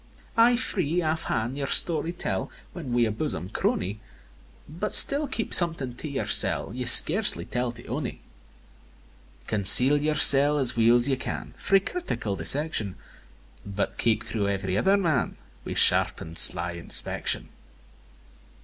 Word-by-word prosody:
V. - - -32 0.2
Ay 235 +2 +2
free, 180 - -4
aff 160 +1 -4
han' 115 +3 -4
your 140 0 -6
story 165 +2 +1
tell, 175 - -6 0.2
When 160 -8 -10
wi' 120 -1 0
a 110 - -4
bosom 105 - -5
crony; 195 - -4 0.7
But 175 +8 -7
still 285 +1 +6
keep 230 -4 -5
something 165 -8 -1
to 155 - -9
yoursel' 135 -6 +1
Ye 125 0 -7
scarcely 180 - +5
tell 125 0 -5
to 120 - -14
ony. 125 +2 -7 1.3
Conceal 125 - +5
yoursel' 150 -1 +5
as 130 -4 -1
weel's 120 +2 +1
ye 135 -2 -2
can - - -9
Frae 195 0 0
critical 195 - -7
dissection; 105 - -2 0.7
But 100 0 -7
keek 110 -2 -2
thro' 105 -3 -4
ev'ry 95 -2 -5
other 195 - 0
man, 170 -8 -3 0.3
Wi' - - -6
sharpen'd, 80 +1 0
sly 90 -1 +4
inspection. 85 -1 -2
135 Hz, 140 wpm, -23 LUFS, 110-170 Hz, 1.3 s, still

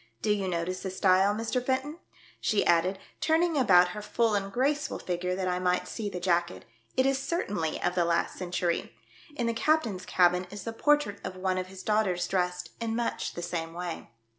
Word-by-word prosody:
Do 210 - +2
you 200 -2 0
notice 180 +1 -2
the 190 - -3
style, 190 +2 +3
Mr. 230 +3 -1
Fenton 265 +5 -1 0.2
.''" - - -26
she 210 - +2
added, 180 +3 +3 0.2
turning 325 +1 +2
about 180 -10 +5
her 210 +4 -6
full 225 +1 +1
and 195 -1 -1
graceful 285 +6 0
figure 180 0 -2
that 185 0 -2
I 180 0 0
might 180 0 +1
see 215 -3 -4
the 180 -2 -5
jacket, 175 -1 0 0.2
" 115 - -36
it 260 - +4
is 270 0 +2
certainly 210 - -2
of 175 - +1
the 180 -1 +2
last 170 0 0
century. 175 -7 -2 0.4
In 240 - -1
the 230 - +1
captain's 225 -8 +1
cabin 180 0 +3
is 205 +1 -8
the 230 - -4
portrait 295 -5 +2
of 185 - -5
one 185 0 -1
of 185 - -4
his 185 0 -10
daughters 200 -5 +1
dressed 180 -1 -1
in 225 -1 -2
much 235 0 -2
the 175 - -5
same 165 -1 -3
way. 175 -1 -5
190 Hz, 205 wpm, -29 LUFS, 180-230 Hz, 0.4 s, about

